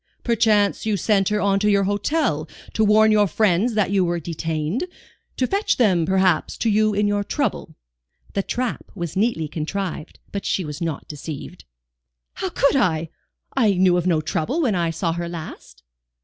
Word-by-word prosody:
"Perchance 220 -3 +2
you 210 -2 +1
sent 195 0 +2
her 210 0 0
on 200 -1 +2
to 210 +1 +2
your 200 -1 +3
hotel 205 - 0 0.2
to 220 - +2
warn 215 +1 +5
your 210 -1 +4
friends 210 +4 +1
that 210 -3 +1
you 195 -2 +3
were 175 -1 0
detained? 165 - -2 0.5
To 255 - +2
fetch 395 - 0
them, 185 -9 +3
perhaps, 190 -3 +2
to 225 - +1
you 215 0 +2
in 205 0 +2
your 205 0 0
trouble?" 230 - -2 0.6
The 200 - +1
trap 245 +4 -3
was 170 -2 -5
neatly 195 -6 +1
contrived, 165 +2 -4
but 200 -1 -4
she 185 - -1
was 150 +2 -7
not 165 -4 -3
deceived. 150 0 -8 0.7
"How 380 - -3
could 280 -5 +2
I? 165 - +1 0.5
I 220 -7 +3
knew 180 -1 +4
of 180 0 0
no 165 -3 +2
trouble 160 - -2
when 235 -7 +2
I 170 -2 0
saw 165 0 -1
her 170 0 -4
last." 165 -2 -9
195 Hz, 175 wpm, -22 LUFS, 165-215 Hz, 0.7 s, warn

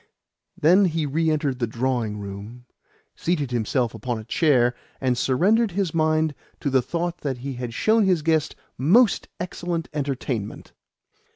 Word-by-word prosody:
Then 180 +6 +5
he 165 -3 0
re 160 +3 +1
entered 145 -4 0
the 120 - 0
drawing 120 -2 -1
room, 105 +4 -8 0.5
seated 150 -7 -1
himself 120 +1 0
upon 115 +2 -3
a 110 - -7
chair, 125 -1 +3 0.3
and 130 -2 +1
surrendered 195 - +2
his 190 -4 -1
mind 155 -1 +2 0.3
to 140 - -1
the 130 -1 +4
thought 170 +5 -3
that 135 -3 -3
he 135 +2 -5
had 125 -1 -5
shown 220 - +3
his 180 -5 +2
guest 160 -1 +1 0.2
most 200 - +4
excellent 175 -1 -3
entertainment. 135 -7 -3
145 Hz, 150 wpm, -24 LUFS, 125-170 Hz, 0.5 s, Then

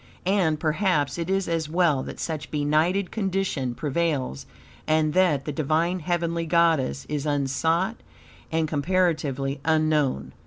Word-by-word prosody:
And 180 -5 +2
perhaps 155 -2 0
it 170 +1 -3
is 195 0 0
as 165 -2 -1
well 165 -5 +2
that - - -8
such 155 -3 -4
a - - -28
benighted 155 +6 +1
condition 190 - -1
prevails, 145 - -2 0.4
and 155 -1 +2
that 165 -7 +2
the 150 - -2
Divine, 160 +5 0
heavenly 170 0 -1
goddess 165 -5 +2
is 150 0 -3
unsought 160 - 0 0.5
and 160 0 +1
comparatively 150 -4 0
unknown. 155 - +1
160 Hz, 130 wpm, -25 LUFS, 145-175 Hz, 0.5 s, And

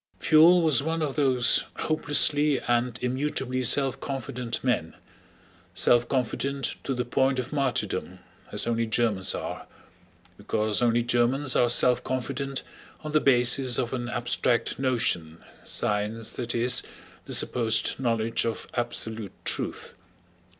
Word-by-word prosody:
Pfuel 165 +3 +5
was 155 -6 +3
one 160 +2 -2
of 145 -3 -2
those 130 -4 +2
hopelessly 145 -1 +3
and 120 -1 -1
immutably 130 0 -1
self 135 +2 +2
confident 125 -3 -5
men, 120 -11 -1 0.8
self 120 0 +3
confident 135 +1 -2
to 135 - -3
the 125 0 -2
point 130 +2 +1
of 130 +3 -4
martyrdom 135 -4 -2 0.3
as - - 0
only 115 -1 -1
Germans 110 -4 0
are, - - -6 0.7
because 110 0 0
only 120 0 +2
Germans 125 +3 +1
are 120 - +3
self 125 +1 +3
confident 135 +2 -4 0.4
on 155 - -5
the 155 0 +2
basis 125 -1 +3
of 120 - -2
an 120 -2 -4
abstract 120 +1 -1
notion—science, 105 0 -2
that 120 -1 -4
is, 120 +1 +4 0.4
the - - -4
supposed 115 -1 +1
knowledge 115 -3 0
of 115 -1 -4
absolute 110 -4 -4
truth. - - -3
125 Hz, 125 wpm, -26 LUFS, 115-135 Hz, 0.8 s, Pfuel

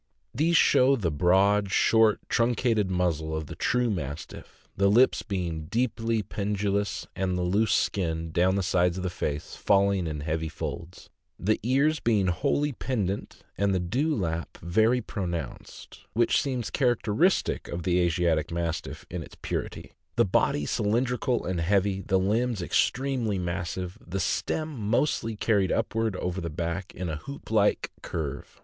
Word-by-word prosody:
These 165 +6 +3
show 135 -1 +5
the 95 -10 -1
broad, 95 +5 +3
short, 110 0 +4
truncated 115 -3 +1
muzzle 85 -4 0
of 80 - -4
the - - -8
true 125 -1 +1
Mastiff, 75 -5 -7
the 100 +1 +3
lips 120 +6 +4
being 85 -5 -3
deeply 115 +2 0
pendulous, 100 -1 -2
and 95 -1 -1
the 90 - -1
loose 100 +5 +2
skin, 80 -4 0
down 90 +3 +2
the 100 - 0
sides 90 -1 +2
of 95 - -4
the 90 - -2
face, 75 -4 -4
falling 100 -3 +2
in 75 -2 -4
heavy 80 +1 -2
folds; 85 +3 -7 0.3
the 110 +4 +1
ears 140 +7 +2
being 105 -5 +2
wholly 145 - +1
pendent 105 -7 -3 0.2
and 100 -1 +2
the - - +1
dewlap 90 - -1
very 110 +8 +3
pronounced 90 -6 -6
(which 120 +2 +3
seems 130 -4 -3
characteristic 125 - +1
of 85 0 -5
the 90 0 +2
Asiatic 85 -2 +1
Mastiff 85 -1 -3
in - - -4
its - - -11
purity), - - -4 0.2
the - - +4
body 75 - +1
cylindrical 120 - 0
and 90 -2 -1
heavy, 95 +2 +1
the 95 0 +1
limbs 105 +2 0
extremely 125 0 0
massive, 90 +2 -4
the 95 +3 -4
stem 155 - -1
mostly 115 +1 0
carried 100 -3 +1
upward 110 -2 0
over 90 +1 -3
the 85 - -3
back 85 +4 -4
in 90 +1 -4
a 80 -2 -3
hoop 140 - -9
like 105 -2 +2
curve. 70 -4 -5
100 Hz, 150 wpm, -27 LUFS, 85-115 Hz, 0.3 s, show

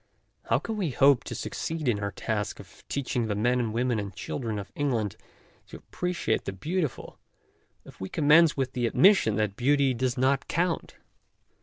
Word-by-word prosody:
How - - +2
can 225 -1 -4
we 185 -6 -1
hope 135 0 +4
to - - -5
succeed 160 -3 -4
in 110 -4 +2
our 100 0 -2
task 105 +2 -3
of - - -15
teaching 125 -4 -1
the 105 - -1
men 120 +4 +1
and 115 -3 -1
women 120 0 0
and 100 -1 -5
the - - -26
children 115 +2 -4
of 100 -1 -7
England 120 -8 -1 0.5
to - - -10
appreciate 180 -10 -2
the 100 - -3
beautiful, 155 - -3 0.7
if - - -15
we 95 - -4
commence 155 +1 +5
with 130 -1 -1
the 120 -2 0
admis 195 - +6
sion 110 - 0
that 105 -2 -1
beauty 135 +2 +2
does 125 +1 -1
not 135 +2 +1
count? 170 0 -1
125 Hz, 185 wpm, -27 LUFS, 110-145 Hz, 0.7 s, admis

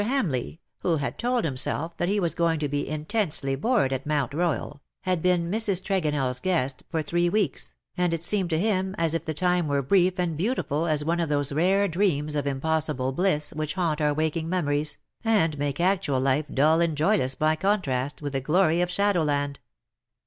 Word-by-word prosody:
Hamleigh, 195 - -1 0.2
who 170 -3 +1
had 140 - -4
told 245 -2 0
himself 150 +3 -1
that 175 - 0
he 205 +1 +1
was 170 -5 0
going 170 -1 +1
to 150 -1 -1
be 145 0 -2
intensely 155 -3 -1
bored 200 - +1
at 135 +2 -4
Mount 145 -5 0
Koyal, 150 -3 -2 0.2
had 185 -3 -1
been 175 -1 +1
Mrs. 210 -4 +2
TregonelFs 150 -10 -1
guest 140 -8 -1
for 160 -2 -1
three 175 +3 +1
weeks, 135 - -1 0.2
and 180 -1 +1
it 165 -1 -2
seemed 190 -1 0
to 160 - +1
him 190 0 0
as 165 -1 0
if 165 - -2
the 155 - -3
time 180 0 +1
were 140 -1 0
brief 185 +5 +3
and 175 -3 -1
beau 210 - 0
tiful 155 - -1
as 150 -2 0
one 170 +2 0
of 165 -3 -1
those 145 -1 0
rare 190 +6 +3
dreams 160 -5 0
of 145 -2 -1
impossible 140 -1 -1
bliss 150 -2 0
which 155 +1 -3
haunt 165 -4 0
our 150 0 +3
waking 160 +2 -1
memories, 150 -4 0 0.3
and 165 -10 +2
make 145 0 -2
actual 175 -7 +1
life 135 +3 +1
dull 155 +4 +3
and 165 -3 0
joyless 155 -5 +2
by 155 +2 +2
contrast 150 -8 -1
with 145 -1 -4
the 135 - -1
glory 165 +3 +2
of 180 - 0
shadowland. 155 -8 0
160 Hz, 195 wpm, -26 LUFS, 145-180 Hz, 0.3 s, brief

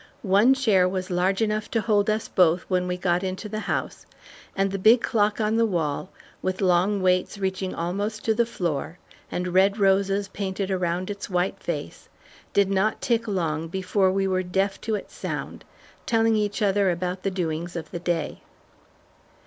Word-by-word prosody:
One 210 +6 +5
chair 200 -9 +3
was 185 0 -4
large 185 +4 +1
enough 215 0 -1
to 225 - 0
hold 210 -2 +2
us 215 0 0
both 180 -1 +3
when 180 -1 0
we 180 0 -2
got 180 -1 +1
into 190 +3 -4
the 215 +1 -4
house, - - -3 0.5
and 195 0 +1
the 195 - -3
big 225 +5 +6
clock 210 -2 +1
on 215 +1 +1
the 230 - +4
wall 165 -2 -2 0.3
with 185 0 -2
long 185 +1 +2
weights 185 +2 +1
reaching 190 -1 -2
almost 205 +6 -3
to 220 - +3
the 235 +1 +1
floor 170 -5 -3 0.3
and 180 0 -2
red 195 +2 +4
roses 195 0 +2
painted 195 0 -3
around 180 +1 -1
its 200 0 -6
white 180 0 0
face, - - -5 0.4
did 200 -1 +2
not 195 +3 +1
tick 230 -1 0
long 165 -5 -1
before 190 +2 +1
we 195 0 0
were 185 -1 +1
deaf 195 +2 -1
to 220 -2 -1
its 205 - -7
sound, - - -5 0.4
telling 225 -1 +3
each 210 0 0
other 200 -1 +3
about 180 +1 -2
the 195 - 0
doings 170 -2 -3
of 160 -3 -6
the 175 - -4
day. 170 -3 -2
190 Hz, 180 wpm, -25 LUFS, 180-210 Hz, 0.5 s, big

